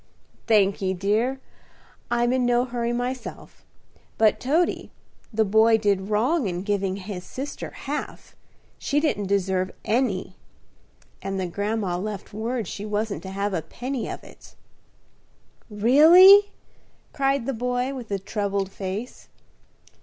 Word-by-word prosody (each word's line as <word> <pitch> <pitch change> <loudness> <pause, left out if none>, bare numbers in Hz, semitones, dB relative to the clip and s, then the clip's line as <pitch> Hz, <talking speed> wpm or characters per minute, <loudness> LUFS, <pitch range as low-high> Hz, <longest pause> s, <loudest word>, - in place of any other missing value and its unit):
"Thankee, 195 -3 +2
dear; 220 +8 0 0.7
I'm 240 +1 +1
in 260 -1 +1
no 245 0 +2
hurry, 240 -1 -2
myself. 245 0 -5 0.5
But, 220 -2 +3
Toady, 320 +7 0 0.4
the 220 -1 +1
boy 220 +2 +4
did 200 -2 0
wrong 240 +6 +1
in 180 0 -3
giving 200 -2 -1
his 190 -2 -7
sister 275 +7 -6
half; 290 +2 -6 0.4
she 290 - 0
didn't 250 -10 -1
deserve 190 -1 0 0.2
any; 210 -6 -1 0.8
and 195 0 -3
the 185 - -1
grandma 200 0 -2
left 205 0 -6
word 225 0 -3
she 200 - -6
wasn't 210 0 -2
to 190 - -8
have 200 +1 -2
a 170 - -1
penny 245 - -5
of - - -7
it." - - -16 1.1
"Really?" 330 - +7 0.6
cried 275 -3 0
the 270 - -1
boy, 250 +2 -1
with 250 -4 -8
a 200 - -1
troubled 200 -1 -2
face. 195 +6 -6
220 Hz, 130 wpm, -24 LUFS, 195-250 Hz, 1.1 s, Really